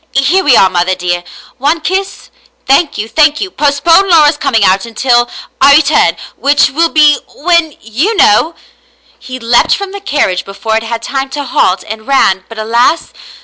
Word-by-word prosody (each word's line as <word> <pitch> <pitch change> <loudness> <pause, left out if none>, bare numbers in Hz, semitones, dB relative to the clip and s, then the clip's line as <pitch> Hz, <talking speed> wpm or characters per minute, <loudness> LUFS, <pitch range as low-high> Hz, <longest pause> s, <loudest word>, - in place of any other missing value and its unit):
Here 290 +9 +1
we 265 -5 +4
are, 190 - +5
mother 185 0 -1
dear. 175 -1 -3 0.4
One 295 +5 0
kiss? 380 +4 -4 0.3
Thank 285 +3 +1
you, 215 - -4
thank 300 +3 +1
you. 380 - -5
Postpone 330 +6 +2
Laura's 310 -3 +4
coming 275 -7 0
out 190 0 +2
until 240 +1 0 0.2
— - - -33
I 280 +1 +6
return 305 0 +2
— - - -25
which 280 -1 +2
will 330 +4 0
be 300 -2 +3
— - - -23
when 340 -4 +1
— - - -25
vou 285 - -1
know." 325 - +2 0.6
He 255 0 -9
leaped 235 0 +1
from 400 -1 -6
the 400 0 -8
carriage 265 - -1
before 200 +3 -4
it 225 - 0
had 225 0 -5
time 270 +1 -4
to 285 +2 -5
halt, 190 -7 0
and 220 +1 -8
ran, 190 -9 +1
but 225 - -11
alas 235 +8 0
275 Hz, 190 wpm, -11 LUFS, 225-315 Hz, 0.6 s, I